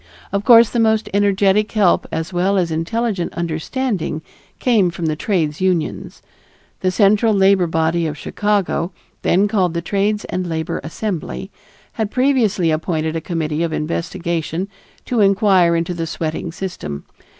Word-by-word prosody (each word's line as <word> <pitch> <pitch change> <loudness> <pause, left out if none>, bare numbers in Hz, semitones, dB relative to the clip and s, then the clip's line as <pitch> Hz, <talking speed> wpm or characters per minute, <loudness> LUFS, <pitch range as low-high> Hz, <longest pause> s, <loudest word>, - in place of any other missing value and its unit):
Of 200 0 -1
course 230 -2 +7
the 240 - 0
most 220 -1 +2
energetic 200 +1 +2
help 205 -5 +3
as 160 +3 -3
well 190 +3 +1
as 175 -3 0
intelligent 185 +3 -2
understanding 170 +2 -2 0.3
came 220 -8 +3
from 170 0 -5
the 155 -1 0
trades 160 -3 -1
unions. 180 -4 -1 0.6
The 185 - +1
central 210 +3 +3
labor 190 -2 +4
body 165 +1 0
of 150 -1 -5
Chicago, 200 -1 -1 0.3
then 195 +4 +3
called 185 -5 0
the 170 - -1
Trades 205 +3 0
and 180 0 -3
Labor 160 -1 -3
Assembly, 160 - -4 0.4
had 220 -2 -2
previously 235 - +2
appointed 160 0 -1
a 165 - -2
committee 160 -2 -2
of 170 -1 0
investigation 170 +2 -3 0.4
to 245 - -1
inquire 195 -4 +4
into 165 +1 -1
the 165 -1 -3
sweating 160 +1 -3
system. 75 - -6
180 Hz, 145 wpm, -19 LUFS, 165-205 Hz, 0.6 s, course